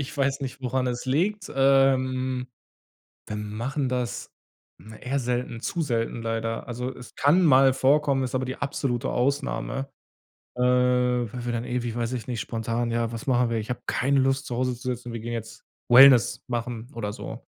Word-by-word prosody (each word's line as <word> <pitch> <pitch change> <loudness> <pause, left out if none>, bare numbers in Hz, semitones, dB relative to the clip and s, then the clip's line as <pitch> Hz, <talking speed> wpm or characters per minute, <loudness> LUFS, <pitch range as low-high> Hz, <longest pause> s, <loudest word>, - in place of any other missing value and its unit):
Ich 140 - -6
weiß 140 0 0
nicht, 135 0 -6
woran 130 +1 0
es 125 -1 -3
liegt. 185 +9 0
Ähm. 130 -1 +2 0.8
Wir 105 - -4
machen 115 +7 -3
das 125 -1 -3 0.5
na, 110 +1 -13
eher 130 +5 -2
selten, 125 -2 -2
zu 170 - -3
selten 115 -4 -2
leider. 115 +1 -3
Also, 125 +2 -4
es 125 - -13
kann 170 +6 +4
mal 135 -3 +6
vorkommen, 135 +1 +2
ist 130 0 -2
aber 130 - -1
die 130 +1 -4
absolute 135 -3 -2
Ausnahme, 135 +1 -1 0.7
äh, 125 - -1
weil 125 -1 +2
wir 120 - -2
dann 120 0 -2
ewig 120 -2 -3
weiß 120 +1 -2
ich 125 0 -5
nicht, 120 -4 -3
spontan, 115 +1 -2
ja: 115 0 -1
„Was 115 +3 -7
machen 125 -2 +2
wir? 115 - 0
Ich 110 - -5
habe 125 - -3
keine 140 +2 +1
Lust, 135 +1 +1
zu 120 - -4
Hause 125 0 0
zu 120 +1 -7
sitzen, 120 0 -9
wir 115 - -5
gehen 120 +1 -5
jetzt 110 -1 -7 0.3
Wellness 130 -1 +7
machen 120 -1 -4
oder 105 -3 -3
so.“ - - -8
125 Hz, 185 wpm, -25 LUFS, 120-135 Hz, 0.8 s, Wellness